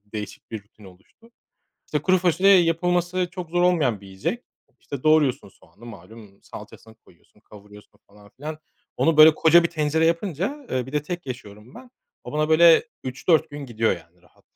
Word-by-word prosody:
değişik 105 Hz, -2 st, -8 dB
bir 110 Hz, -3 st, -7 dB
rutin 105 Hz, 0 st, -21 dB
oluştu. 95 Hz, -, -20 dB, 0.6 s
İşte 150 Hz, -2 st, -3 dB
kuru 185 Hz, +2 st, +3 dB
fasulye 180 Hz, +2 st, +2 dB
yapılması 175 Hz, +2 st, -1 dB
çok 180 Hz, -3 st, -8 dB
zor 175 Hz, +1 st, 0 dB
olmayan 155 Hz, -, +1 dB
bir 100 Hz, -, -14 dB
yiyecek. 95 Hz, -, -5 dB, 0.4 s
İşte 140 Hz, -3 st, -8 dB
doğruyorsun 150 Hz, -6 st, +2 dB
soğanı 95 Hz, +4 st, -19 dB
malum 110 Hz, -3 st, -14 dB
salçasını 110 Hz, 0 st, -13 dB
koyuyorsun 105 Hz, -1 st, -27 dB
kavuruyorsun 105 Hz, -1 st, -17 dB
falan 100 Hz, 0 st, -20 dB
filan. 155 Hz, +3 st, -7 dB, 0.4 s
Onu 165 Hz, -1 st, +1 dB
böyle 155 Hz, 0 st, +8 dB
koca 165 Hz, +2 st, +5 dB
bir 170 Hz, -, -1 dB
tencere 160 Hz, 0 st, 0 dB
yapınca, 190 Hz, -, -3 dB
eee, 130 Hz, -1 st, -2 dB
bir 135 Hz, -, -11 dB
de 150 Hz, -1 st, -1 dB
tek 175 Hz, 0 st, -7 dB
yaşıyorum 110 Hz, -2 st, -10 dB
ben. 250 Hz, 0 st, -14 dB, 0.3 s
O -, -, -9 dB
bana 155 Hz, +1 st, -1 dB
böyle 165 Hz, +4 st, +6 dB, 0.2 s
3-4 155 Hz, +5 st, 0 dB
gün 145 Hz, -1 st, -8 dB
gidiyor 115 Hz, -1 st, 0 dB
yani 85 Hz, +1 st, -20 dB
rahat. 90 Hz, -, -28 dB
150 Hz, 175 wpm, -23 LUFS, 110-170 Hz, 0.6 s, böyle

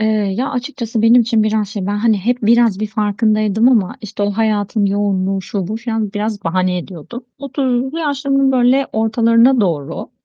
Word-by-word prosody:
Eee, 215 Hz, -, +1 dB, 0.3 s
ya 260 Hz, +3 st, -1 dB
açıkçası 245 Hz, -4 st, -3 dB
benim 235 Hz, +2 st, +6 dB
için 225 Hz, -1 st, +1 dB
biraz 215 Hz, -1 st, 0 dB
şey, 205 Hz, -2 st, -5 dB
ben 205 Hz, +1 st, -1 dB
hani 215 Hz, 0 st, +2 dB
hep 240 Hz, +6 st, -1 dB
biraz 230 Hz, -2 st, +3 dB
bir 215 Hz, -, -1 dB
farkındaydım 215 Hz, +1 st, +1 dB
ama 220 Hz, -8 st, +1 dB
işte 205 Hz, -1 st, -6 dB
o 205 Hz, -, +1 dB
hayatın 210 Hz, -1 st, 0 dB
yoğunluğu 195 Hz, -1 st, -1 dB
şu 190 Hz, -2 st, -4 dB
bu 215 Hz, -, -3 dB
falan 225 Hz, -3 st, -3 dB
biraz 210 Hz, -1 st, -3 dB
bahane 185 Hz, +1 st, 0 dB
ediyordum. 185 Hz, -, -9 dB
30'lu 265 Hz, +1 st, -2 dB
yaşlarımın 275 Hz, -3 st, 0 dB
böyle 255 Hz, +2 st, +3 dB
ortalarına 230 Hz, +3 st, +3 dB
doğru, 160 Hz, -8 st, -2 dB
220 Hz, 170 wpm, -17 LUFS, 205-245 Hz, 0.3 s, benim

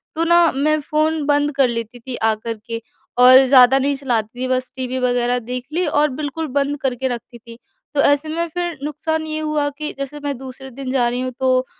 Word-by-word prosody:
तो 330 Hz, -, 0 dB
ना, 340 Hz, 0 st, +5 dB
मैं 305 Hz, +3 st, +1 dB
फ़ोन 310 Hz, +1 st, 0 dB
बंद 290 Hz, 0 st, +2 dB
कर 270 Hz, -2 st, +4 dB
लेती 235 Hz, 0 st, -5 dB
थी 250 Hz, +1 st, -6 dB
आ 220 Hz, -1 st, +1 dB
कर 225 Hz, +1 st, -6 dB
के 230 Hz, 0 st, -5 dB, 0.4 s
और 255 Hz, +1 st, +9 dB
ज़्यादा 260 Hz, 0 st, +6 dB
नहीं 280 Hz, +1 st, +1 dB
चलाती 240 Hz, -4 st, -2 dB
थी, 255 Hz, -, -1 dB
बस 255 Hz, 0 st, -1 dB
टीवी 255 Hz, 0 st, -3 dB
वगैरह 245 Hz, 0 st, +1 dB
देख 250 Hz, +1 st, -6 dB
ली 360 Hz, +1 st, +1 dB
और 295 Hz, +1 st, +2 dB
बिल्कुल 310 Hz, +2 st, -3 dB
बंद 285 Hz, +1 st, 0 dB
करके 260 Hz, -1 st, -1 dB
रखती 240 Hz, -1 st, -6 dB
थी। 230 Hz, 0 st, -13 dB, 0.4 s
तो 280 Hz, -, +4 dB
ऐसे 285 Hz, +2 st, +2 dB
में 335 Hz, +2 st, -1 dB
फिर 345 Hz, -3 st, -3 dB
नुकसान 315 Hz, +2 st, -2 dB
ये 310 Hz, 0 st, -3 dB
हुआ 305 Hz, -2 st, 0 dB
कि 305 Hz, 0 st, -4 dB
जैसे 275 Hz, +2 st, -6 dB
मैं 285 Hz, -3 st, -2 dB
दूसरे 265 Hz, 0 st, -9 dB
दिन 260 Hz, +1 st, -6 dB
जा 250 Hz, -3 st, +2 dB
रही 245 Hz, +1 st, -3 dB
हूँ, 255 Hz, 0 st, -3 dB
तो 255 Hz, 0 st, +2 dB
265 Hz, 220 wpm, -20 LUFS, 250-300 Hz, 0.4 s, और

